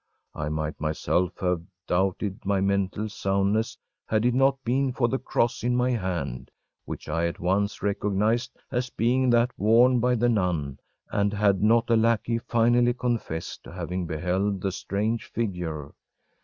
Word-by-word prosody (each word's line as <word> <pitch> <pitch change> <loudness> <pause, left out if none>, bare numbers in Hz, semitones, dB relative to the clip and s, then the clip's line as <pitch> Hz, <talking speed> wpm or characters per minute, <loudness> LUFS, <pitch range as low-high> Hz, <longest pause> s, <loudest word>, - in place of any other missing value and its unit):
I 75 0 -3
might 75 0 -3
myself 80 +3 0
have 90 -2 +1 0.2
doubted 95 +2 0
my 100 0 +1
mental 100 +2 0
soundness 100 +1 0 0.3
had 110 +1 +1
it 125 - +3
not 135 +1 +3
been 130 +2 +1
for 120 -1 +1
the 130 +2 -1
cross 120 -1 0
in 120 0 +1
my 125 +1 +2
hand, 85 - -3 0.4
which - - -7
I 85 +2 0
at 85 - -5
once 100 +4 0
recognized 105 +5 0
as 125 0 -1
being 125 +3 +1
that 120 +1 +3
worn 120 +4 +5
by 125 +1 +2
the 120 +1 +2
nun, 90 - 0 0.3
and 100 0 +1
had 100 -2 +2
not 115 +2 +4
a - - +6
lackey 115 +1 +2
finally 120 +1 +2
confessed 115 -10 -3
to - - -10
having 90 0 -4
beheld 90 +5 -1
the 95 - -1
strange 105 +5 -2
figure. 85 -10 -4
105 Hz, 155 wpm, -26 LUFS, 90-120 Hz, 0.4 s, a